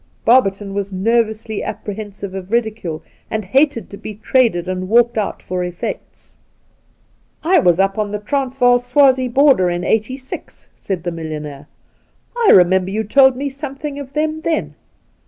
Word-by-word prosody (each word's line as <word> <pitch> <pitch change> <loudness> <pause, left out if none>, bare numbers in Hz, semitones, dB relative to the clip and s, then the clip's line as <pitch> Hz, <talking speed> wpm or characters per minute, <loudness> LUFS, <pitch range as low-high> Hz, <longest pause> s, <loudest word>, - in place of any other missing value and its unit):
Barberton 205 -5 +3
was 200 0 -3
nervously 220 +2 0
apprehensive 205 -2 -6
of 190 0 -7
ridicule, 220 -9 -2 0.3
and 215 -2 -3
hated 270 +4 +1
to 200 - -8
be 215 - -8
traded 220 -6 +1
and 185 0 -3
walked 240 +1 +4
out 215 -2 -3
for 185 0 -4
eflfects. 180 -1 -6 0.6
' - - -40
I - - +7
was 175 -1 +3
up 195 +2 +1
on 210 -1 -1
the 210 - -2
Transvaal 250 +1 +1
Swazie 260 +1 +3
border 255 -7 +4
in 175 0 -2
'86,' 255 +6 -3
said 185 -4 -4
the 175 - -2
millionaire. 150 -3 -7 0.4
' - - -42
I 470 -3 +2
remember 185 +1 +5
you 215 +3 -2
told 265 +4 +5
me 280 +3 -3
something 280 +1 -6
of 275 -1 -9
them 310 +1 -1
then. 320 -1 -2
220 Hz, 155 wpm, -18 LUFS, 190-260 Hz, 0.6 s, I